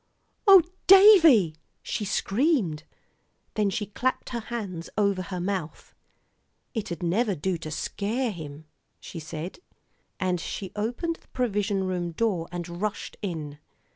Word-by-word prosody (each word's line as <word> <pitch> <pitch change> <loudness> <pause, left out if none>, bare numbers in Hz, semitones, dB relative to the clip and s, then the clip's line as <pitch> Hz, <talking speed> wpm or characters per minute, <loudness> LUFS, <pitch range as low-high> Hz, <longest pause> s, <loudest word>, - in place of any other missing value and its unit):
"Oh! 385 -3 +9 0.2
Davie," 335 - +8 0.3
she 210 - -3
screamed. 205 - 0 0.7
Then 210 -2 +1
she 205 +2 -2
clapped 250 +5 -2
her 240 - -3
hands 205 -7 -5
over 200 -3 +2
her 180 0 -5
mouth. 180 -3 -4 0.8
"It 190 -6 -4
never'd 195 +1 +1
do 190 -1 +1
to 155 - -6
scare 215 +9 -2
him," 155 -4 -9 0.3
she 170 - -8
said. 160 +3 -7 0.6
And 180 -2 0
she 190 0 -5
opened 245 +11 -2
the - - -28
provision 205 -5 -1
room 180 -2 -2
door 185 -4 0
and 175 0 -6
rushed 210 -1 -3
in. 155 -7 -5
195 Hz, 130 wpm, -26 LUFS, 170-230 Hz, 0.8 s, Oh